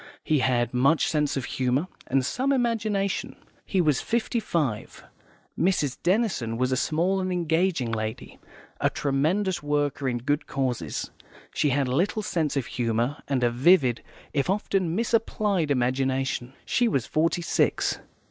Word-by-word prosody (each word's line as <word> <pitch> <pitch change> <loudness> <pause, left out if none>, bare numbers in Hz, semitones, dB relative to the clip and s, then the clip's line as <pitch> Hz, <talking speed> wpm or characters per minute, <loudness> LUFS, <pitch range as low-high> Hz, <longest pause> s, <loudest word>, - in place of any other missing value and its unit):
He 155 -2 +2
had 125 -2 +1
much 135 +6 +3
sense 150 -3 0
of 130 - -2
humour, 130 +6 0 0.2
and 130 0 +1
some 265 - 0
imagination. 220 -6 0 0.3
He 190 - 0
was 150 -5 +2
fifty 235 0 0
five. 150 - -2 0.5
Mrs. 160 -7 +1
Denison 180 - 0
was 130 +1 0
a - - +2
small 170 +8 +1
and 185 0 -2
engaging 165 -6 0
lady, 110 0 -4 0.4
a - - +2
tremendous 165 +8 0
worker 145 -2 0
in 120 - -1
good 145 +5 -1
causes; 125 - -2 0.4
she 150 - +1
had 140 0 +1
little 180 +11 0
sense 155 -6 -1
of 135 - 0
humour, 120 +3 -1
and 135 -3 0
a 120 - +3
vivid, 130 -1 +4 0.3
if 140 +3 0
often 190 -3 0
misapplied, 215 -6 0
imagination. 130 -1 0
She 245 - +2
was 135 - 0
forty 165 +2 0
six. - - +1
145 Hz, 145 wpm, -26 LUFS, 130-185 Hz, 0.5 s, vivid